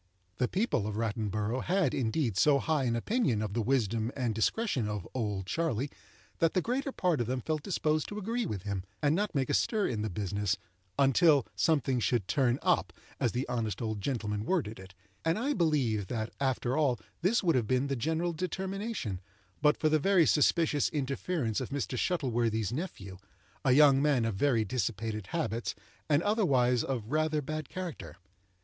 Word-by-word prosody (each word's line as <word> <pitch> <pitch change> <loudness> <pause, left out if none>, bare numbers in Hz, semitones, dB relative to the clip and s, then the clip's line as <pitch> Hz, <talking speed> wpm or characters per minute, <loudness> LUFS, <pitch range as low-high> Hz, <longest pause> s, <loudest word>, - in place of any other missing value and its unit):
The 125 - +1
people 185 - 0
of 105 - -4
Rattleborough 110 +1 -1
had, 180 -6 +1
indeed, 120 - 0
so 145 +8 +5
high 150 -1 0
an 120 -1 +1
opinion 120 - 0
of 105 -2 -4
the 115 - 0
wisdom 115 -2 0
and 125 -4 -1
discretion 125 - 0
of 105 -4 -4
"Old 105 -6 -2
Charley," 140 - -1 0.5
that 165 +2 +2
the 185 - +3
greater 270 +3 -1
part 175 - +1
of 115 - -2
them 130 +1 -1
felt 155 +4 -2
disposed 155 -4 0
to 205 - -6
agree 230 +4 -2
with 100 -4 -4
him, 100 -2 -3 0.2
and 145 +2 +3
not 205 -1 -1
make 135 -2 +1
a - - -1
stir 215 -3 +2
in 110 -4 -1
the 110 - -2
business 100 +1 -1 0.4
"until 140 +1 +5
something 135 -5 +2
should 115 -4 0
turn 130 -3 +2
up," - - +2 0.3
as - - +1
the 125 +3 -2
honest 110 -5 -2
old 110 -3 -3
gentleman 105 -5 -2
worded 115 - -1
it; 95 0 -13 0.3
and 165 +1 +1
I 275 +6 0
believe 135 - +1
that, 110 0 -3
after 130 -2 0
all 140 -6 +2 0.2
this 200 +5 +2
would 170 -3 +3
have 120 -4 +1
been 130 +3 +2
the 140 -1 -1
general 160 +7 -1
determination, 190 - -3 0.4
but 150 0 +4
for 155 - +1
the 155 0 +3
very 185 +1 +4
suspicious 150 0 +3
interference 140 - -2
of 130 - -4
Mr. 140 -2 -3
Shuttleworthy's 120 - 0
nephew, 100 - -6 0.4
a 130 -3 +4
young 140 -1 +6
man 140 -5 +2
of 115 - 0
very 115 +1 +2
dissipated 110 -2 -2
habits, 120 -7 -2 0.3
and 150 +2 +3
otherwise 130 - +2
of 120 -4 -3
rather 155 -1 +1
bad 155 +1 -4
character. 185 -4 -6
130 Hz, 180 wpm, -30 LUFS, 110-160 Hz, 0.5 s, young